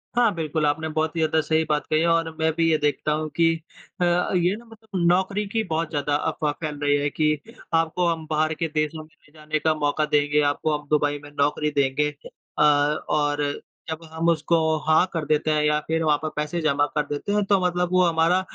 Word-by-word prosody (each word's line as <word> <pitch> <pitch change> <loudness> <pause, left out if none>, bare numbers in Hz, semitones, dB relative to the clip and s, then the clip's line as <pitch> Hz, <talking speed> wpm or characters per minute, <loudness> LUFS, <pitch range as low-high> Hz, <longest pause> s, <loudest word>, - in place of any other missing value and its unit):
हाँ, 235 -3 +3
बिल्कुल, 155 -1 -1
आपने 160 +2 0
बहुत 160 +1 0
ही - - -2
ज़्यादा 160 0 +2
सही 160 +1 +1
बात 150 -1 0
कही 155 - +2
है 170 - +2
और 165 -1 +2
मैं 160 0 +2
भी 165 0 +1
ये 155 - +3
देखता 150 0 0
हूँ 155 0 -1
कि 165 -1 +3 0.5
अ, - - +4
ये 180 +1 +1
ना 235 +2 -13
मतलब 220 -5 -7
नौकरी 190 +3 +1
की 220 +2 -1
बहुत 165 -3 -2
ज़्यादा 145 -1 -1
अफ़वाह 150 0 -1
फैल 150 -2 -4
रही 145 0 +3
है 145 0 0
कि 150 0 0 0.3
आपको 165 +2 +1
हम 165 -1 -1
बाहर 155 +1 +1
के 165 - 0
देशों 155 +1 -1
में 155 - -19 0.2
ले 145 - -24
जाने 155 0 -2
का 160 +1 +2
मौका 150 0 0
देंगे, 150 0 +2
आपको 150 +1 0
हम 145 -1 -15
दुबई 145 -1 +1
में 145 - -12
नौकरी 150 +1 +1
देंगे। 145 +2 +1 0.5
अ - - +5 0.5
और 145 -1 +1 0.4
जब 160 +1 -5
हम 160 +1 -2
उसको 165 +1 +2 0.3
हाँ 160 +3 +5
कर 165 -2 -2
देते 155 +1 +1
हैं 150 0 +2
या 150 0 +2
फिर 160 0 0
वहाँ 150 -2 +3
पे 155 +1 -4
पैसे 150 +3 -2
जमा 145 -2 +2
कर 150 - +1
देते 145 +8 -4
हैं। 210 0 +2
तो 195 -1 +3
मतलब 180 0 0
वो 185 0 +4
हमारा 170 +2 +2
155 Hz, 225 wpm, -24 LUFS, 150-165 Hz, 0.5 s, अ